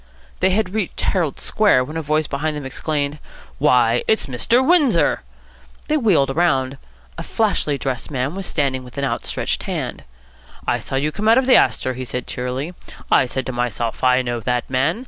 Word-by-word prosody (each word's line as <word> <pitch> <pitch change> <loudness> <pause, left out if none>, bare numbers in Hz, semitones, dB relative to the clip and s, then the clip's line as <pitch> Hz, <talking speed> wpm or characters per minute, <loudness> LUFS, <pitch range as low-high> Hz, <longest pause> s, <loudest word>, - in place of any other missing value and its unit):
They 185 - +3
had 190 0 0
reached 210 -4 -2
Herald 170 -8 0
Square, 205 -12 +3
when 150 +5 -8
a 165 - -1
voice 155 +1 0
behind 150 +2 -2
them 145 - -6
exclaimed, 145 +2 -2 0.4
"Why, 120 -1 +3
it's 220 - +2
Mr. 230 - +1
Windsor!" 335 -7 +3 0.7
They 310 - +3
wheeled 170 - +2
round. 135 -6 +1 0.4
A - - -3
flashily 190 -9 0
dressed 130 -3 -3
man 135 +1 -2
was 195 0 -3
standing 135 -4 -1
with 125 +1 -14
outstetched 140 -1 -2
hand. - - -4 0.6
"I - - +1
saw - - -4
you 145 +3 0
come 215 +7 -3
out 225 +2 +6
of 260 - +3
the 260 - +6
Astor," 130 - +3
he 130 +1 -5
said 125 0 -4
cheerily. 130 +6 -4 0.4
"I 130 - +5
said 130 +1 -3
to - - -3
myself, 120 -1 -2
'I 130 0 +4
know 120 -1 -2
that 125 +1 -1
man.' 135 - +1
140 Hz, 185 wpm, -20 LUFS, 130-185 Hz, 0.7 s, out